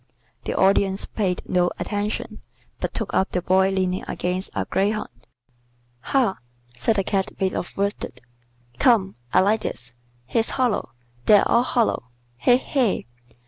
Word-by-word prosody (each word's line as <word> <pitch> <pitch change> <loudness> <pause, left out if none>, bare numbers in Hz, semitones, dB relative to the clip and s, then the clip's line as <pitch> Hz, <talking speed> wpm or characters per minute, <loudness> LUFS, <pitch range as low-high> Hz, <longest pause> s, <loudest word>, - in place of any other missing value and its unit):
The - - -2
Audience 195 0 +3
paid 185 -4 -2
no 175 -1 +2
attention, 210 +1 -3 0.4
but - - -2
took - - -4
up 190 - +2
the 180 - 0
Boy 190 +1 +4
leaning 185 -1 0
against 180 +2 -2
a - - -1
greyhound. 210 +2 0 0.9
"Ha!" 240 - +1 0.4
said 130 - +1
the 195 - +1
Cat 195 0 -1
made 190 -1 +1
of - - -5
worsted. 200 -10 -2 0.6
"Come. 210 -6 +4 0.2
I - - +5
like 210 +3 +2
this. 120 -1 -5 0.3
He's 225 - 0
hollow. 245 - 0 0.3
They're 205 -1 +6
all 235 - +4
hollow. 235 - 0 0.3
He! 245 - +5
he! 255 -5 0
195 Hz, 140 wpm, -23 LUFS, 185-215 Hz, 0.9 s, They're